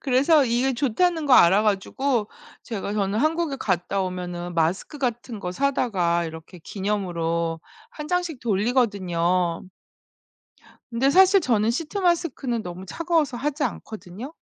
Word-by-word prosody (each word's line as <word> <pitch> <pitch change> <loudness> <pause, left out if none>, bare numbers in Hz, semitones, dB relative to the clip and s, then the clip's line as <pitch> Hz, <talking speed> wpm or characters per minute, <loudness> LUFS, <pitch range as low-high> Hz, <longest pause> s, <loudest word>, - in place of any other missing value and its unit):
그래서 280 +3 +4
이게 250 +3 +1
좋다는 300 +6 0
거 270 - +2
알아 190 +3 +6
가지고 220 +3 0 0.3
제가 205 -2 -5
저는 205 0 -1
한국에 315 -1 0
갔다 185 +1 -1
오면은 180 -1 -4
마스크 175 - -1
같은 240 -4 -3
거 180 - -4
사다가 185 -10 0
이렇게 160 +2 -9
기념으로 170 -5 -2 0.3
1 300 -8 -8
장씩 355 -6 -1
돌리거든요. 190 -6 0 1.3
근데 255 +4 +2
사실 380 +4 +6
저는 225 -4 +2
시트 320 - -4
마스크는 330 - 0
너무 180 +1 -8
차가워서 315 - -1
하지 290 +3 -2
않거든요. 220 - -6
225 Hz, 305 characters per minute, -24 LUFS, 180-280 Hz, 1.3 s, 알아